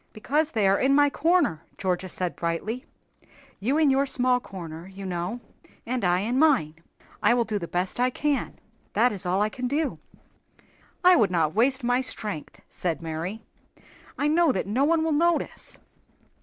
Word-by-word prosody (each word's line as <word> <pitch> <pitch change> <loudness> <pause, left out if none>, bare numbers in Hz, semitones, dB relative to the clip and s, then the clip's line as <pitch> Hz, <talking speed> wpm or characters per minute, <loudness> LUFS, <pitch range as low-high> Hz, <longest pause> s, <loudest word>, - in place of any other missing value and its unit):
"Because 295 +8 -1
they 215 -4 +2
are 195 +1 +3
in 275 +1 +3
my 290 0 +4
corner," 325 - +2 0.2
Georgia 185 0 -2
said, 180 0 -3
brightly. 200 - -3 0.7
"'You 255 +9 0
in 305 -3 +4
your 275 +1 +2
small 250 -1 +2
corner,' 170 -6 -9
you 195 +1 -9
know, 180 +6 -3 0.4
'and 250 0 -2
I 180 0 +2
in 240 +5 0
mine.' 275 - +3 0.5
I 235 +3 +4
will 240 -1 +1
do 215 -2 -2
the 170 - -5
best 180 +6 -2
I 250 +1 +3
can; 285 +2 -2 0.4
that 250 - +3
is 195 -3 -3
all 190 +3 +2
I 210 - 0
can 250 +3 -4
do." 290 +3 -1 1.0
"I 365 0 +7
would 215 - +3
not 165 -4 +1
waste 260 +4 +2
my 245 +1 +2
strength," 210 - -4
said 170 -2 -3
Mary. 165 +7 -5 0.7
"I 290 - +1
know 325 0 +4
that 190 - -2
no 240 +8 +1
one 325 +1 +2
will 320 - 0
notice." 335 +3 0
235 Hz, 175 wpm, -26 LUFS, 185-280 Hz, 1.0 s, I